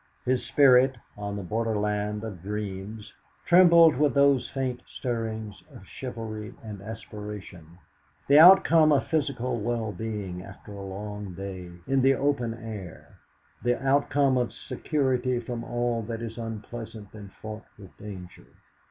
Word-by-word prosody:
His 125 -1 +1
spirit, 130 +1 +5 0.2
on 100 0 -5
the 100 - -5
borderland 105 0 -1
of 100 -6 -7
dreams, 105 +1 -6 0.3
trembled 170 -3 +7
with 145 -3 +2
those 140 -2 +4
faint 130 -2 -3
stirrings 110 -4 -4
of 95 - -13
chivalry 110 -3 -7
and 105 -3 -8
aspiration, 105 -6 -9 0.5
the 145 +2 +7
outcome 165 -3 +8
of 140 -2 +3
physical 135 -6 -1
well 115 0 -2
being 100 -2 -5
after 100 +2 -12
a 100 - -8
long 100 0 -6
day 95 -2 -7 0.2
in 135 0 +2
the 135 +1 +5
open 130 -5 0
air, 110 -7 -9 0.4
the 120 0 +1
outcome 135 -1 +2
of 120 - -1
security 130 -4 -1
from 120 0 -5
all 120 -1 -1
that 115 +1 -5
is 115 -1 -6
unpleasant 110 -1 -7
and 105 -2 -10
fraught 110 +1 -8
with 95 -3 -14
danger. 95 -4 -10
115 Hz, 135 wpm, -27 LUFS, 105-130 Hz, 0.5 s, outcome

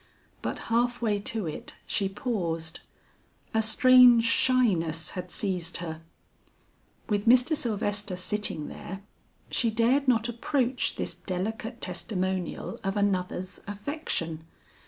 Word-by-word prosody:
But - - -3 0.2
half 240 +1 +2
way 210 -3 +2
to 215 0 -3
it 155 - -6
she 195 -1 0
paused. 170 -7 -3 0.7
A 220 - +3
strange 250 +1 +7
shyness 200 -10 +2
had 180 -1 -6
seized 180 -3 -1
her. 160 -2 -6 1.1
With 205 0 -1
Mr. 250 +6 +6
Sylvester 205 -5 -1
sitting 180 -4 -1
there, 190 +2 -8 0.5
she 235 - +2
dared 240 +5 +2
not 230 -2 +3
approach 250 +1 0
this - - -3
delicate 220 +5 -4
testimonial 185 -3 -3
of 195 +1 -1
another's 185 -2 -1
affection. 200 - -3
205 Hz, 115 wpm, -28 LUFS, 180-235 Hz, 1.1 s, strange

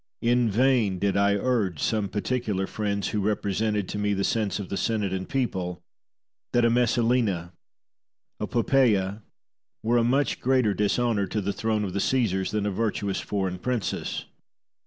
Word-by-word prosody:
In 120 0 +3
vain 115 -3 +2
did 100 +1 0
I 100 0 +3
urge 100 -6 0
to - - -4
some 105 -3 0
particular 105 -2 -1
friends, 100 -1 -2
who 105 - -1
represented 105 0 0
to 105 - -3
me 105 0 +1
the 100 - -1
sense 105 -3 0
of 100 -3 -6
the - - -2
Senate 105 -3 -1
and 95 0 -4
people, 90 -9 -2 0.7
that 120 -1 +4
a 115 - +4
Messalina, 115 -7 +1 0.9
a 105 - -2
Poppaea, 110 -5 +2 0.6
were 120 +2 +2
a - - +2
much 135 +5 +1
greater 125 -5 +2
dishonour 105 0 +1
to 105 - -2
the 100 0 -2
throne 110 +1 -1
of 95 -3 -3
the 100 - -1
Caesars 100 -7 +1
than 105 -1 -1
a 105 - 0
virtuous 100 -1 -1
foreign 95 -3 -2
princess. 125 0 -2
105 Hz, 165 wpm, -26 LUFS, 100-120 Hz, 0.9 s, that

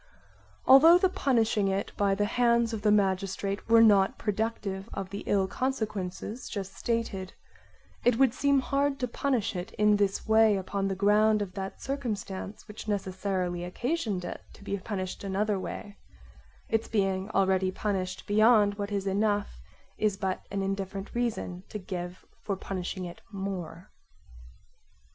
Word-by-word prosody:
Although 315 +6 +9
the 370 +1 +3
punishing 225 - +2
it 195 +1 -1
by 200 -1 +2
the 205 +1 +1
hands 235 +1 +2
of 215 - -3
the 210 - +3
magistrate 195 0 0
were 230 0 +7
not 200 -3 +5
productive 210 -2 -2
of 195 -1 -5
the 200 - -4
ill 195 -2 +2
consequences 215 -2 -3
just 195 -2 -5
stated, 225 -5 -2 0.7
it 245 -2 +3
would 265 -3 +4
seem 280 +1 +2
hard 275 +1 0
to 250 - -1
punish 240 -4 -1
it 180 +5 -5
in 210 0 +3
this 200 -1 0
way 220 -1 +5
upon 195 +1 -2
the 195 - -1
ground 210 +2 +4
of 185 -2 -9
that 195 0 -6
circumstance 215 -8 -4
which 210 0 -9
necessarily 185 -3 -2
occasions 210 - -2
it - - -6
to - - -15
be 200 - -2
punished 185 -2 -5
another 200 +1 0
way; 205 +2 -7 0.7
its 225 0 0
being 195 -2 0
already 190 -2 +2
punished 185 -2 -3
beyond 210 -1 +4
what 200 0 -3
is 200 -1 -1
enough 205 - 0 0.4
is 210 -2 +1
but 190 -2 -3
an 195 0 -2
indifferent 195 0 -4
reason 230 -7 -2
to - - -5
give 180 -2 -6 0.2
for 200 - -2
punishing 185 -1 -4
it 175 - -9
more. 190 -3 -6
205 Hz, 150 wpm, -28 LUFS, 190-225 Hz, 0.7 s, Although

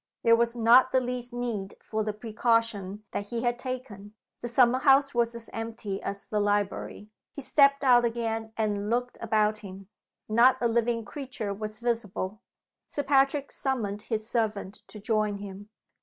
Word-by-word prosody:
There 230 -1 +6
was 235 0 +1
not 240 +3 +6
the 260 - +4
least 250 -1 -4
need 235 -5 -4
for 220 0 -3
the 215 - -1
precaution 215 -2 -1
that 205 - -4
he 235 +2 -3
had 240 0 0
taken. 235 -6 -7 0.3
The 240 - -3
summer 245 +1 +4
house 275 0 +4
was 235 -1 +1
as 230 -1 -7
empty 225 -3 -5
as 200 0 -5
the 210 - -1
library. 205 0 -1 0.2
He 285 - -6
stepped 280 +1 +4
out 245 -2 +6
again 225 -1 -2
and 210 -2 -1
looked 245 +1 -1
about 215 -1 +1
him. 195 -1 -11 0.4
Not 240 +4 +5
a 240 - +2
living 230 0 0
creature 235 -3 -5
was 215 +1 -6
visible. 220 -3 -3 0.5
Sir 290 - -3
Patrick 275 0 +2
summoned 215 -7 -2
his 220 0 -3
servant 215 -5 -2
to 210 - -10
join 215 -1 0
him. 200 +1 -9
230 Hz, 165 wpm, -28 LUFS, 210-245 Hz, 0.5 s, There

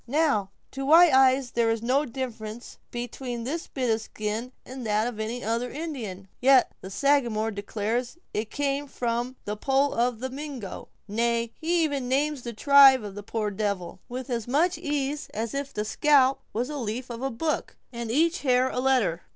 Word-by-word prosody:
Now, 275 -8 +1 0.2
to 270 - -5
white 325 +3 +7
eyes 260 -1 +4
there 235 -1 +2
is 225 0 -1
no 265 +5 +2
difference 235 -3 -6
between 240 0 -5
this 315 +7 -4
bit 255 -4 -1
of 220 - -2
skin 215 +3 -4
and 260 0 -8
that 215 0 +1
of 240 -3 -4
any 230 +3 -3
other 230 +3 -1
Indian, 270 - -5
and 195 0 -17
yet 260 0 +5
the 190 - -8
Sagamore 235 -3 +1
declares 220 +6 -3 0.2
it 215 +1 -2
came 285 0 -1
from 245 0 -2
the 210 - -2
poll 270 +5 +1
of 240 0 0
a 260 - -1
Mingo; 270 -7 -7 0.2
nay, 230 +2 0
he 335 +1 +1
even 280 -5 -1
names 285 +1 +1
the 240 - -5
tribe 270 +1 +7
of 205 -2 -6
the 205 - -7
poor 210 0 -2
devil, 195 -4 -3
with 255 +2 -5
as 235 -2 -2
much 330 +8 +2
ease 295 -2 -2
as 225 +1 -3
if 275 0 -3
the 210 -4 -3
scalp 270 +2 +3
was 240 +5 -2
the 300 - -4
leaf 240 +2 -4
of 235 0 -6
a 270 - -1
book, 305 +6 -2 0.2
and 235 -1 -5
each 330 - +2
hair 255 -1 +3
a - - -2
letter. 250 -10 +2
250 Hz, 190 wpm, -26 LUFS, 225-275 Hz, 0.2 s, white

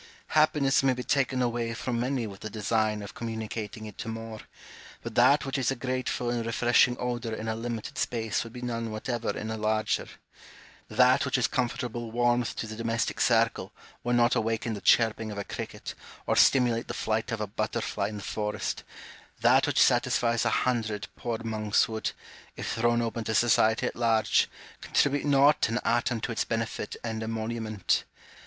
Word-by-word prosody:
Happiness 150 -3 +3
may 135 -1 +3
be 125 0 -5
taken 130 -2 +1
away 120 -1 -1
from 120 0 -2
many 125 0 -1
with 100 -2 -8
the 110 - -6
design 110 0 0
of 100 +1 -9
communicating 110 -1 -5
it 105 -2 -10
to 115 - -5
more: 115 -1 -6 0.6
but 115 - -6
that 130 +6 +5
which 135 0 -2
is 125 - +1
a 135 - 0
grateful 130 -1 -2
and 120 -1 -1
refreshing 120 +2 +3
odour 120 -2 -2
in 110 +1 -6
a 110 - 0
limited 115 -1 -5
space 110 -2 -1
would 115 - -10
be 125 +1 -8
none 115 -2 -3
whatever 115 +2 -3
in 110 - -4
a 110 - -3
larger; 110 0 0 0.8
that 125 +3 +4
which 135 -1 +1
is 125 - +2
comfortable 120 -2 -2
warmth 120 +1 +1
to - - -3
the 110 0 -7
domestic 115 +1 -1
circle - - +2 0.3
would 120 0 +1
not 120 0 +4
awaken 115 +1 -1
the 100 - -6
chirping 110 -1 +3
of 105 - -7
a 100 - -2
cricket, - - -6 0.3
or - - +1
stimulate 120 -3 +4
the - - -5
flight 110 +3 -1
of 115 - -2
a 105 - -1
butter 110 +3 -2
fly, 100 -3 -2
in 105 0 -6
the 100 - -7
forest; 105 -1 -3 0.6
that - - +5
which - - +1
satisfies 115 -1 +3
a - - +3 0.2
hundred 110 -4 -1
poor 115 -2 -3
monks 110 -2 +1
would, 110 -1 -2 0.5
if - - -4
thrown 120 +1 +2
open 115 0 -3
to 110 0 -2
society 110 -1 +3
at - - -2
large, 115 -2 +2 0.3
contribute 145 0 +1
not 145 -2 +4
an 115 - 0
atom 120 0 +1
to 120 - -3
its 115 - 0
benefit 115 -2 -3
and 110 -1 -3
emolument. 110 -2 -1
115 Hz, 185 wpm, -28 LUFS, 110-120 Hz, 0.8 s, that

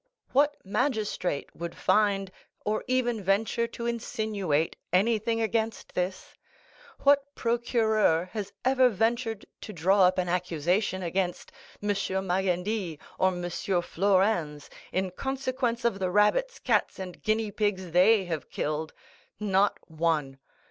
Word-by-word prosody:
What 290 +2 +3
magistrate 210 - -1
would 170 0 -6
find, 200 -3 +2 0.3
or 215 +1 0
even 245 -3 +1
venture 220 +5 +1
to 235 0 -7
insinuate, 215 -9 -1 0.2
anything 225 +4 +2
against 225 0 -2
this? 180 +1 -3 0.7
What 285 0 +3
procureur 220 -7 +2
has 210 -3 -4
ever 260 -1 +5
ventured 225 0 -1 0.2
to - - -7
draw 190 +2 +3
up 185 +1 +3
an 180 -1 0
accusation 180 +2 0
against 180 +1 -2 0.3
M. 205 - -1
Magendie 190 -1 -1 0.2
or 185 - +4
M. 175 -1 -2
Flourens, 180 -3 0 0.2
in 185 0 -1
consequence 255 0 -2
of 230 -4 +1
the 185 -1 0
rabbits, 210 - +2
cats, - - +1
and 185 -2 -7
guinea 215 -1 0
pigs 195 -4 -1
they 190 +4 +5
have 165 -4 -4
killed?—not 190 +6 -2
one. 155 -4 -1
200 Hz, 120 wpm, -28 LUFS, 180-225 Hz, 0.7 s, ever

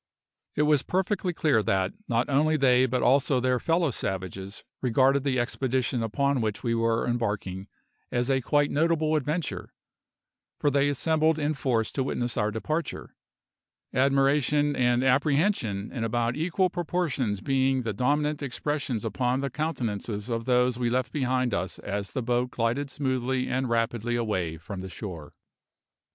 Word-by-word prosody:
It 150 - +2
was 150 -2 +4
perfectly 190 +1 -1
clear 150 -9 +2
that 95 -1 0
not 120 +1 +1
only 155 +3 +2
they 130 -2 +4
but 125 0 -1
also 135 +1 +3
their 125 0 +1
fellow 165 0 +1
savages 95 -1 -5 0.2
regarded 130 +2 +3
the 135 -3 +1
expedition 125 0 -1
upon 135 +4 0
which 110 -2 -2
we 115 - +1
were 115 0 +1
embarking 105 -5 -2 0.4
as 120 0 0
a 135 -1 +2
quite 145 +3 +2
notable 155 0 +2
adventure, 150 +2 -3 0.8
for 145 - +1
they 140 +1 +3
assembled 160 +2 +2
in 150 0 0
force 120 -6 0
to 135 - -1
witness 120 -2 -2
our 105 - +1
departure, 155 +10 -4 0.8
admiration 140 +2 +2
and 125 -1 +2
apprehension 135 - +1
in 120 -4 -3
about 120 +1 0
equal 180 +3 +1
proportions 155 - -1
being 135 +2 +1
the 110 -2 -2
dominant 150 +7 0
expressions 140 -3 -3
upon 125 0 0
the 140 - -2
countenances 115 -8 -3
of 115 -1 -2
those 125 -1 +2
we 120 -1 +1
left 125 +1 0
behind 130 -4 0
us 90 0 -2
as 100 0 -4
the 130 - -3
boat 125 +1 0
glided 125 +4 -1
smoothly 130 -2 -1
and 130 0 -1
rapidly 115 0 0
away 95 -9 -1
from 95 +4 -7
the 95 - -7
shore. 85 -4 -8
130 Hz, 150 wpm, -27 LUFS, 115-145 Hz, 0.8 s, was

